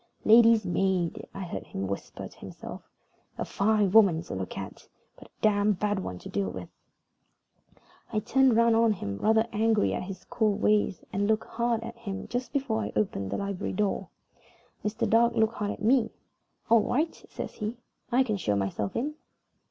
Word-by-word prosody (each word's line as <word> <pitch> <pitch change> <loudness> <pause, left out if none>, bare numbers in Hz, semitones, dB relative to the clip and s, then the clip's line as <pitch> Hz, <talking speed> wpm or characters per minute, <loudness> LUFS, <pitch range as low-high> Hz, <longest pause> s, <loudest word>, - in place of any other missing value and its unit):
"Lady's 225 0 +6
maid," 180 -1 0
I 195 - -7
heard 175 - -6
him 95 - -4
whisper 100 +1 -5
to - - -19
himself. - - -9 0.6
"A - - -2
fine 205 -1 +2
woman 190 -6 +5
to - - -7
look 95 -1 -5
at, - - -8 0.3
but - - -15
a - - -36
damned 205 -2 +3
bad 205 0 0
one 90 - -5
to - - -10
deal 100 -1 -1
with." 90 -1 -7 1.4
I - - -2
turned 260 +3 +3
round 230 0 +4
on 225 -1 +4
him, 100 - -5
rather 220 +1 +3
angry 220 0 +2
at - - -2
his 190 0 -7
cool 215 -3 +1
ways, 210 -2 +1
and 200 +1 +1
looked 220 0 +1
hard 235 -1 -1
at 235 +1 -8
him 200 -4 -5
just 245 +1 -3
before 265 -6 -1
I - - -3
opened 100 - -1
the - - -2
library 200 -2 -3
door. 205 +1 -1 0.7
Mr. 220 +2 -1
Dark 230 +2 +4
looked 220 0 +2
hard 210 -2 -3
at 210 - -5
me. 235 0 +3 0.6
"All 230 -1 +6
right," 305 +9 0 0.2
says - - -6
he. 215 +2 -4 0.3
"I 255 +2 +4
can 215 -5 -1
show 105 - 0
myself 100 0 -2
in." 290 +6 -1
215 Hz, 185 wpm, -28 LUFS, 190-230 Hz, 1.4 s, Lady's